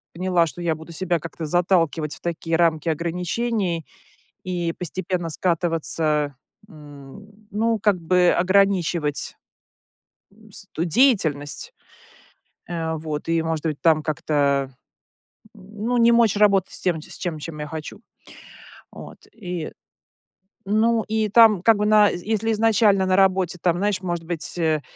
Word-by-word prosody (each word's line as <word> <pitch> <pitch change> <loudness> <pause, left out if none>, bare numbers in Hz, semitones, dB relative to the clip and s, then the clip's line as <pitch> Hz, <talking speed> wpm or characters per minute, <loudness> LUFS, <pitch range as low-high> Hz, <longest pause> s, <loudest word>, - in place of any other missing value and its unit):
поняла, 180 -1 +1
что 175 - -8
я 165 -2 0
буду 160 +2 -12
себя 175 +1 -1
как-то 165 +1 -7
заталкивать 165 -2 +1
в - - -16
такие 165 -1 -2
рамки 165 -1 +1
ограничений 175 +3 -2 0.6
и 175 -2 -2
постепенно 180 0 -4
скатываться, 160 -3 0 0.3
м, 155 +8 -14
ну, 225 +2 0
как 205 -3 +2
бы 180 +1 +3
ограничивать, 180 -5 +1 0.9
м, 215 +2 -20
с 195 - -11
ту 165 - -2
деятельность, 175 - +1 1.0
э, 165 -2 -3
вот. 155 -1 -5
И, 165 0 +1
может 160 -1 -3
быть, 155 -2 -3
там 160 -2 +3
как-то, 140 -3 0 0.8
м, 205 +1 -9
ну, 245 +1 0
не 235 0 +5
мочь 235 -3 +4
работать 200 -3 +3
с - - -2
тем, 175 -4 0
с - - -13
ч 175 - -3
с 155 - -7
чем 155 0 -7
я 150 - -5
хочу, 160 +6 -8 0.9
от. - - -11
И, 180 -7 -6 0.9
ну, 220 +3 +2
и 215 0 0
там 220 -3 +6
как 225 +2 +4
бы 210 - 0
на 210 -1 +5
з 175 - -6
если 220 +1 0
изначально 210 -3 +3
на 185 0 +2
работе 190 -2 +2
там, 175 -1 +1
знаешь, 200 0 -1
может 175 -3 -4
быть, 165 0 -5
э, 160 -3 +1
175 Hz, 145 wpm, -22 LUFS, 160-205 Hz, 1.0 s, там